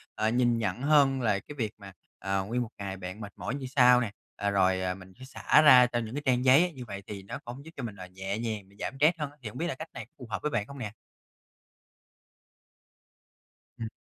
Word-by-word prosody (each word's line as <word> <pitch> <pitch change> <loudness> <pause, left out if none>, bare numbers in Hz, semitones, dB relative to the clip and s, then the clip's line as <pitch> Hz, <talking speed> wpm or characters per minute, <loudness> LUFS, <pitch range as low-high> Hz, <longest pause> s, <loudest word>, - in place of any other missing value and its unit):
ờ, 110 - +1
nhìn 120 0 +2
nhận 105 0 -2
hơn 140 -2 +4
là 105 -4 +2
cái 150 - -11
việc 110 -5 -1
mà, 100 -2 -11 0.3
ờ, 95 0 -1
nguyên 120 +4 -1
một 120 - -3
ngày 100 -1 -5
bạn 95 +3 -7
mệt 100 -2 -8
mỏi 110 +8 -4
như 140 -2 -5
sao 125 -2 +7
nè, 115 -4 -2 0.2
ờ, 100 - -1
rồi 95 -1 +2
mình 95 0 -14
phải 130 - -10
xả 135 +3 +3
ra 130 -5 +8
cho 120 -1 -1
những 115 +1 -5
cái 145 - -2
trang 125 -1 +2
giấy 145 +8 +6
như 130 -3 -8
vậy 100 -3 -7
thì 100 -2 -7
nó 100 - -6
cũng 125 +4 -8
giúp 160 - -10
cho 135 - -5
mình 110 -4 -5
là 90 -2 -9
nhẹ 95 +2 -4
nhàng, 110 -3 -3
giảm - - -3
stress 160 +5 +4
hơn 150 -2 -3
á, 145 - -22
thì 110 - -4
hổng 105 - -10
biết 170 - -1
là 165 - -3
cách 160 +4 -8
này 110 - -7
có 115 - -36
phù 125 - -9
hợp 105 - -3
với 150 - -1
bạn 105 -6 -1
không 140 - -10
nè? 110 -4 -4 2.9
Ừm. 115 - -3
115 Hz, 250 wpm, -29 LUFS, 100-130 Hz, 2.9 s, ra